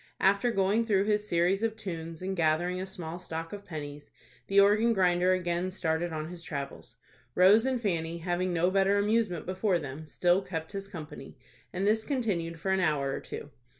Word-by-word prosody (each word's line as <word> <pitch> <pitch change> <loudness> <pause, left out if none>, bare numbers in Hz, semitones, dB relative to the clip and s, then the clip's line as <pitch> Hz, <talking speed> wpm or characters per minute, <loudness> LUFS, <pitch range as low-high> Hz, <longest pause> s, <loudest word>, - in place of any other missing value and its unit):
After 200 +5 +3
going 205 +1 +2
through 200 -4 +2
his 210 0 +1
series 175 +4 +2
of 225 -1 0
tunes, 165 -5 -6
and 190 +1 -2
gathering 175 +2 +1
a 190 - -4
small 175 -3 -6
stock 165 -1 -6
of 200 -1 -7
pennies, 150 -5 -8 0.4
the 195 0 +4
organ 215 +4 +5
grinder 180 -2 +3
again 175 0 -1
started 170 -2 -1
on 155 -1 -4
his 175 -1 -8
travels. 140 -4 -6 0.4
Rose 205 +7 +6
and 260 -2 0
Fanny, 170 -6 -1
having 175 +2 -1
no 175 +1 +2
better 195 +1 +3
amusement 205 -4 +1
before 185 +1 +1
them, 155 0 -7
still 175 +4 +2
kept 160 -4 -5
his 195 -1 -5
company, 165 -6 -9 0.3
and 185 +2 -2
this 220 +1 +2
continued 190 - -2
for 190 - -1
an 190 - +2
hour 150 -6 +1
or - - -3
two. 145 - -8
185 Hz, 185 wpm, -29 LUFS, 165-200 Hz, 0.4 s, Rose